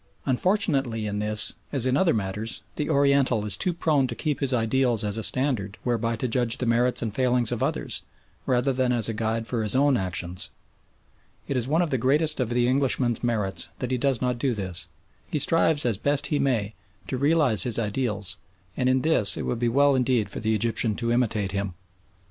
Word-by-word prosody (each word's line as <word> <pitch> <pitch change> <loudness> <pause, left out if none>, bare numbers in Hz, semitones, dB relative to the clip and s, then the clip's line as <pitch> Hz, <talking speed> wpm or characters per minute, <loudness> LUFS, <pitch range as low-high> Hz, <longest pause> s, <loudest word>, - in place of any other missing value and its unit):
Unfortunately 135 - +1
in 105 0 -3
this, 105 0 +1 0.2
as 135 -4 0
in 130 0 +2
other 170 +3 +3
matters, 105 +2 -4
the 150 - -3
Oriental 140 -5 +2
is 105 -3 0
too 180 - 0
prone 155 -5 +1
to 120 - -6
keep 150 +1 -2
his 140 -2 0
ideals 120 -1 +1
as 105 -1 -1
a 110 - -2
standard 115 -5 0
whereby 115 -1 -1
to 120 +3 -3
judge 120 -1 0
the 125 - -3
merits 120 +1 +2
and 110 -3 -3
failings 125 -2 +2
of 120 - -3
others, - - -2 0.5
rather 125 +1 +1
than 130 -1 0
as 120 -3 0
a 115 - -2
guide 110 +1 -2
for 115 -1 -2
his 105 +1 +2
own 140 -1 +3
actions. 90 -2 -4 1.0
It 140 - -2
is 125 -1 0
one 160 +5 +2
of 170 - -3
the 130 - 0
greatest 150 +5 +1
of 125 -3 0
the 120 0 +1
Englishman's 130 -3 +1
merits 105 -5 -1
that 125 -1 -4
he 125 - 0
does 135 -2 0
not 125 -1 -1
do 130 -2 0
this. 90 -3 -3 0.4
He - - -2
strives 160 0 +2
as 115 -5 +1
best 145 +5 0
he 145 - +1
may 110 -6 0 0.3
to - - -3
realise 145 -6 +3
his 120 -3 +4
ideals, 105 -3 -1 0.4
and 130 -1 +1
in 130 0 +2
this 150 -10 +3
it - - -3
would 120 - -2
be 120 0 +1
well 140 +3 +3
indeed 125 -4 +1
for - - -5
the 110 0 0
Egyptian 110 0 0
to 115 +1 -2
imitate 110 -5 0
him. 100 -2 -3
120 Hz, 205 wpm, -25 LUFS, 110-135 Hz, 1.0 s, his